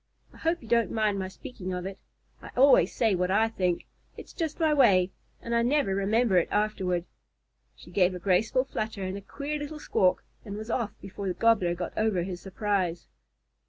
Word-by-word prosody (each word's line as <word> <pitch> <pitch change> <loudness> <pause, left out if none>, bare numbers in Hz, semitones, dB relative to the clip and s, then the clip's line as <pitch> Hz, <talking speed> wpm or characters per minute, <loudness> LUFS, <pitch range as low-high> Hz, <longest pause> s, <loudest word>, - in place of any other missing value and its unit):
I - - -15
hope 330 -2 -1
you - - -12
don't 235 0 +2
mind 215 -3 0
my 190 - -2
speaking 190 -2 -7
of 180 0 -4
it. 195 0 -6 0.4
I - - -10
always 255 -9 +6
say 225 -4 +2
what 180 0 0
I 220 +4 +3
think. 180 -5 -1 0.3
It's - - -11
just 325 -3 -3
my 315 -2 +3
way, 190 -10 +4 0.3
and 235 - -3
I 235 - +3
never 255 -4 +2
remember 200 +1 +2
it 175 - +3
afterward." 190 -4 0 0.7
She 175 - -15
gave 180 0 +2
a - - -5
graceful 205 +7 +2
flutter 220 -6 -4
and 185 +1 -3
a 200 - -6
queer 285 +9 -5
little 295 +1 -6
squawk, 185 -10 +1 0.2
and 205 -2 -6
was 220 +2 -5
off 225 -4 -2
before 195 0 -6
the 180 - -1
Gobbler 200 -7 +3
got 175 - -5
over 215 -5 +1
his 180 -1 -6
surprise. 190 -3 -2
205 Hz, 195 wpm, -28 LUFS, 185-235 Hz, 0.7 s, always